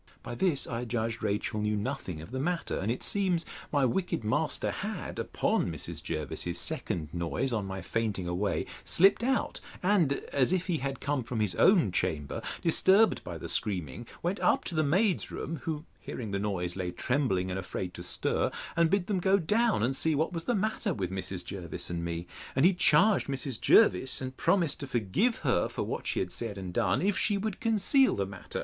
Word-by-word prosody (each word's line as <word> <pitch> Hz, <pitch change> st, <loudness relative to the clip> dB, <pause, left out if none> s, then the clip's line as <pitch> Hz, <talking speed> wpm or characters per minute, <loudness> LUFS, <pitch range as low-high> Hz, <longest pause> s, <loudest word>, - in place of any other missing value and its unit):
By -, -, -6 dB
this 155 Hz, +1 st, +1 dB
I 120 Hz, 0 st, -3 dB
judged 115 Hz, -1 st, -2 dB
Rachel 105 Hz, 0 st, -1 dB
knew 105 Hz, 0 st, +1 dB
nothing 105 Hz, -, -4 dB
of 80 Hz, -, -12 dB
the 130 Hz, -, -3 dB
matter; 170 Hz, +4 st, -1 dB
and 105 Hz, +4 st, -1 dB
it 125 Hz, -, -3 dB
seems 185 Hz, -4 st, 0 dB, 0.3 s
my 145 Hz, -3 st, +3 dB
wicked 175 Hz, +1 st, -1 dB
master 110 Hz, -, 0 dB
had, -, -, -5 dB
upon -, -, 0 dB
Mrs. 80 Hz, -4 st, -6 dB
Jervis's 85 Hz, +2 st, -4 dB
second 75 Hz, -3 st, -3 dB
noise 85 Hz, +10 st, -1 dB
on 105 Hz, -4 st, -1 dB
my 95 Hz, 0 st, -5 dB
fainting 105 Hz, -5 st, -2 dB
away, 95 Hz, +4 st, -1 dB, 0.2 s
slipt 195 Hz, +6 st, +4 dB
out, 260 Hz, +2 st, 0 dB, 0.2 s
and, 180 Hz, -7 st, +3 dB, 0.2 s
as 135 Hz, +2 st, +2 dB
if 185 Hz, -1 st, +1 dB
he 175 Hz, -4 st, 0 dB
had 135 Hz, 0 st, -4 dB
come 145 Hz, -1 st, 0 dB
from 115 Hz, -1 st, -4 dB
his 105 Hz, -4 st, +1 dB
own 170 Hz, -, +5 dB
chamber, 80 Hz, -5 st, -1 dB, 0.2 s
disturbed 190 Hz, +6 st, +4 dB
by -, -, -6 dB
the -, -, -7 dB
screaming, 90 Hz, -, -1 dB, 0.2 s
went 180 Hz, +4 st, -1 dB
up -, -, +3 dB
to -, -, -5 dB
the 155 Hz, -, +2 dB
maids' 185 Hz, +5 st, +2 dB
room, 165 Hz, -, -4 dB
(who, 155 Hz, -1 st, -3 dB
hearing 110 Hz, -5 st, -6 dB
the 100 Hz, -, -1 dB
noise, 90 Hz, -4 st, -2 dB
lay 90 Hz, -2 st, -2 dB
trembling, 95 Hz, -2 st, 0 dB
and 95 Hz, -, -2 dB
afraid 90 Hz, -1 st, -4 dB
to -, -, -8 dB
stir,) 85 Hz, -, 0 dB, 0.3 s
and 170 Hz, -1 st, +4 dB
bid 195 Hz, -1 st, +2 dB
them 195 Hz, -1 st, 0 dB
go 190 Hz, +2 st, +4 dB
down, 210 Hz, -, +2 dB
and 130 Hz, +3 st, +1 dB
see 160 Hz, +2 st, +1 dB
what 160 Hz, +5 st, 0 dB
was 165 Hz, -1 st, -4 dB
the 245 Hz, -, +1 dB
matter 210 Hz, -2 st, -1 dB
with 95 Hz, -3 st, -3 dB
Mrs. 95 Hz, -1 st, -4 dB
Jervis 90 Hz, -3 st, -5 dB
and 85 Hz, -1 st, -3 dB
me. 85 Hz, 0 st, -3 dB, 0.3 s
And 135 Hz, +4 st, +4 dB
he 190 Hz, -, +6 dB
charged 200 Hz, +3 st, +4 dB
Mrs. 135 Hz, -3 st, -4 dB
Jervis, 125 Hz, +8 st, +5 dB
and 130 Hz, 0 st, -5 dB
promised 175 Hz, -2 st, +2 dB
to 140 Hz, -, -5 dB
forgive 130 Hz, -, +1 dB
her 120 Hz, -10 st, +2 dB
for -, -, -3 dB
what -, -, -4 dB
she -, -, 0 dB
had 90 Hz, -1 st, -3 dB
said 115 Hz, -4 st, -5 dB
and 95 Hz, -2 st, -6 dB
done, 90 Hz, -, +1 dB
if 200 Hz, 0 st, +2 dB
she 205 Hz, -2 st, +2 dB
would 210 Hz, -1 st, -3 dB
conceal 230 Hz, +5 st, +3 dB
the 100 Hz, -, 0 dB
matter. 95 Hz, -1 st, -6 dB
125 Hz, 205 wpm, -30 LUFS, -, 0.3 s, he